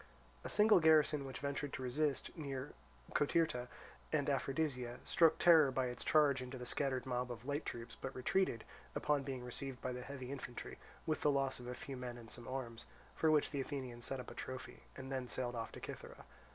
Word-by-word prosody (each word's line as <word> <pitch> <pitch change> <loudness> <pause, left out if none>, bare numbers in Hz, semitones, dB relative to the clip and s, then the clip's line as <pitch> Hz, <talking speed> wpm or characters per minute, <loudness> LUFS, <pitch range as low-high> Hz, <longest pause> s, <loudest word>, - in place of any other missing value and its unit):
A - - -4
single 210 -2 +6
garrison 155 -3 +5
which 130 - -6
ventured 140 0 -2
to 130 - -4
resist, 140 +3 0
near 140 -5 -4 0.4
Cotyrta 145 -4 +2 0.4
and - - +2
Aphrodisia, 130 -4 -1
struck 165 -2 +5
terror 160 -5 +7
by 130 -1 0
its 125 - -6
charge 145 -4 +4
into 125 +1 -6
the 125 - -6
scattered 130 0 0
mob 125 -1 -1
of 120 0 -7
light 145 +2 -2
troops, 115 -1 -5
but 130 - -4
retreated, 130 -2 +1 0.3
upon 150 -1 +2
being 135 -2 -4
received 130 +1 -5
by 130 - -2
the 125 0 -4
heavy 130 -1 -6
infantry, 125 -3 -6 0.3
with 155 - 0
the 150 - +4
loss 135 -2 +1
of 125 - -8
a 125 - -4
few 135 0 -6
men 125 -1 -5
and 115 -1 -10
some 120 -1 -7
arms, 125 -3 -4 0.3
for 160 - +3
which 155 -1 +4
the 140 -2 -1
Athenians 130 -4 -5
set 135 +2 -2
up 125 - -7
a - - -7
trophy, 130 -1 -6 0.2
and 130 +1 -6
then 130 -2 -2
sailed 120 -1 -2
off 115 -1 -4
to - - -7
Cythera. - - -8
130 Hz, 205 wpm, -37 LUFS, 125-145 Hz, 0.4 s, terror